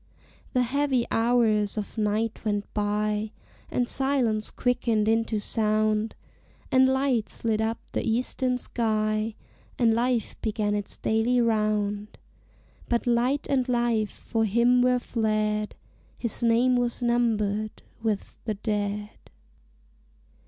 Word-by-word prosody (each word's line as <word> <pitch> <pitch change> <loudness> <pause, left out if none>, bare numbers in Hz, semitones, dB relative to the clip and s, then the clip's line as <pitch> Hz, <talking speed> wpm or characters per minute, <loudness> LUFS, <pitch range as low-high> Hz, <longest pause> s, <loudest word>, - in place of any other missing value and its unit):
The 250 - +3
heavy 265 -1 +1
hours 225 -3 +2
of 210 - -4
night 215 +1 -1
went 205 -2 -1
by, 210 +1 -1 0.4
And 245 -1 0
silence 255 -6 0
quickened 235 -4 0
into 225 0 +1
sound, 215 0 +1 0.6
And 260 0 +5
light 265 -4 +1
slid 220 -1 -1
up 225 +1 0
the - - -1
eastern 250 +2 0
sky, 215 -2 -1 0.4
And 230 -2 +4
life 240 0 -1
began 210 -1 -1
its 205 -1 -2
daily 225 +3 +1
round 210 -2 0 0.7
But 235 -1 +1
light 245 +4 +1
and 260 -2 +1
life 235 -3 +1
for 225 -1 -2
him 235 +4 +4
were 250 0 +4
fled: 215 -3 -1 0.4
His 235 -1 -3
name 240 +2 +3
was 245 0 -1
numbered 215 -3 0 0.2
with 220 -3 -3
the 215 -2 -1
dead. 210 0 -2
225 Hz, 115 wpm, -26 LUFS, 215-245 Hz, 0.7 s, And